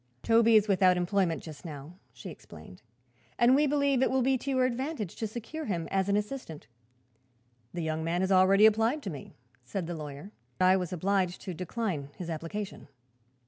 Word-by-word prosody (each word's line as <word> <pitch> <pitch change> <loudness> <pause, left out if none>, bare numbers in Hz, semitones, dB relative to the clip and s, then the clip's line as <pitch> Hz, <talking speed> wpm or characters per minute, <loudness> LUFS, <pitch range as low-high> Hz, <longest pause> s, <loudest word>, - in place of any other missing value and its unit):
"Toby 230 0 +4
is 215 0 +5
without 185 -2 +4
employment, 180 -1 0
just 155 0 -10
now," 150 -1 -8 0.2
she - - -9
explained, 85 +3 -13 0.6
"and 240 +2 +5
we 295 +2 +4
believe 280 -2 +2
it 265 - +3
will 260 -1 +1
be 265 +1 +3
to 260 +2 -4
your 260 -1 +2
advantage 255 - -3
to 220 - -2
secure 240 +9 -6
him 170 -6 -2
as 195 0 0
an 200 - +3
assistant." 210 - -5 1.1
"The 175 -1 -4
young 160 0 -2
man 170 +2 -1
has 190 +1 0
already 195 +2 +6
applied 225 +7 +3
to 195 - -4
me," 145 - -10 0.3
said 175 +8 -4
the 175 - -4
lawyer. 150 +3 -8 0.3
"I 185 +1 +5
was 180 -3 -2
obliged 185 0 0
to 185 - -5
decline 180 -4 -3
his 170 -2 -5
application." 175 +6 -6
195 Hz, 185 wpm, -29 LUFS, 170-230 Hz, 1.1 s, already